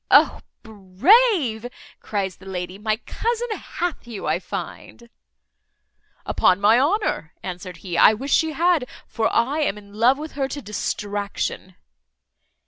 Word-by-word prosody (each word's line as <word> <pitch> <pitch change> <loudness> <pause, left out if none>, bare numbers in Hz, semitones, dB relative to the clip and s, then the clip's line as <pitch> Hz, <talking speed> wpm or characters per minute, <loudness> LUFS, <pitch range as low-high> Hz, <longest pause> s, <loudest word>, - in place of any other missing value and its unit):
"O - - +5 0.2
brave!" 230 - +3 0.3
cries 195 -4 -3
the 190 - -15
lady, 185 0 -5
"my 215 0 0
cousin 475 0 -2
hath 350 - -4
you, 225 -4 -7
I - - +1
find." 235 0 -8 1.1
"Upon 185 - +3
my 215 +4 +5
honour," 295 - 0
answered 180 -1 -7
he, 170 -2 -1
"I 215 - +7
wish 270 +6 -3
she 320 -1 +2
had; 330 -4 +2 0.2
for 225 -1 -1
I 275 +6 +1
am 290 -9 0
in 200 -1 -14
love 240 +5 +4
with 310 +1 -7
her 275 -2 -2
to 285 - -5
distraction." 205 -4 -4
220 Hz, 135 wpm, -22 LUFS, 200-300 Hz, 1.1 s, I